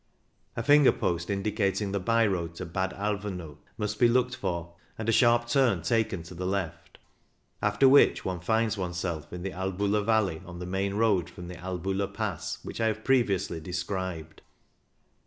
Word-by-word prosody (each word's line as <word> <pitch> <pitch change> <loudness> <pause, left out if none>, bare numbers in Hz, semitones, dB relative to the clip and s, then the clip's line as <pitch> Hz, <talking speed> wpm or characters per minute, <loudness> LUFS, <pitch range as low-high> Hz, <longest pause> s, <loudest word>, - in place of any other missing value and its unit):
A - - -2
finger 145 -1 +6
post 85 +1 -2
indicating 100 0 0
the 100 - 0
by 115 +4 +3
road 85 -4 -2
to 90 - -5
Bad 95 +3 -1
Alvaneu 95 -6 -4 0.2
must 105 -1 -3
be 120 - +6
looked 125 +1 +2
for, 85 -1 -4 0.2
and 110 - -5
a - - +4
sharp 120 0 +4
turn 120 - +2
taken 110 -2 0
to 85 - -11
the 90 +1 -4
left; 90 -4 -4 0.6
after 135 - +4
which 140 +2 +5
one 90 -2 -2
finds 110 +3 0
one's 90 -2 -3
self 85 -4 -4
in 90 0 -6
the 95 - -3
Albula 100 +3 -1
valley 105 -6 +1
on 85 -2 -9
the 90 - -6
main 95 +2 -1
road 105 -5 +2
from, 90 0 -9
the 90 - -7
Albula 95 +2 -3
Pass 100 -4 -3
which - - -6
I 115 - +3
have 110 0 -2
previously 100 -10 +1
described. 90 -1 -4
95 Hz, 175 wpm, -28 LUFS, 90-110 Hz, 0.6 s, finger